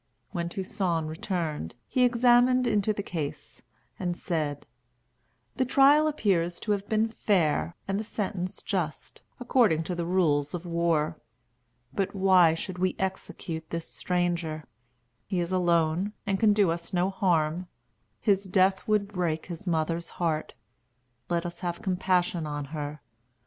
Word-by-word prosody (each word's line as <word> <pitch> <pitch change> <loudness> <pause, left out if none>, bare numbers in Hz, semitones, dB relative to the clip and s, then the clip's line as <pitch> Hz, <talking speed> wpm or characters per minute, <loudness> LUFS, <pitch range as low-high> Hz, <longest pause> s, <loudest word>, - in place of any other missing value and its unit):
When 170 -3 -2
Toussaint 180 -3 -1
returned, 160 - -3
he 255 - +2
examined 245 +1 +4
into 210 -2 +2
the 200 -1 -3
case, 155 -7 -5 0.4
and 175 -2 -2
said: 150 -5 -2 0.9
"The 260 - +3
trial 280 +4 +5
appears 180 - +1
to 215 - -2
have 200 -1 -1
been 220 0 +2
fair, 175 -7 +1
and 195 +1 0
the - - -2
sentence 195 -4 -4
just, 175 -6 -3 0.2
according 235 -10 +3
to 180 - -3
the 170 -1 -3
rules 155 -5 +2
of 175 0 -6
war. 170 -2 0 0.7
But 195 0 -1
why 185 -4 +5
should 180 +2 -6
we 185 0 +1
execute 165 -4 -4
this 165 -1 -4
stranger? 175 -3 -1 0.6
He 190 -3 -1
is 170 +1 -2
alone, 175 +1 +2
and 195 -2 0
can 220 -2 +5
do 205 -4 +3
us 170 0 -5
no 180 +2 +2
harm. 175 -2 +1 0.5
His 200 -1 +2
death 190 0 +2
would 210 -2 +2
break 175 -6 -2
his 180 +2 -8
mother's 165 0 0
heart. 160 -3 -1 0.7
Let 170 0 0
us 175 0 -5
have 175 -2 -4
compassion 180 -3 +1
on 145 -1 -4
her. 150 -1 -5
180 Hz, 145 wpm, -28 LUFS, 165-200 Hz, 0.9 s, trial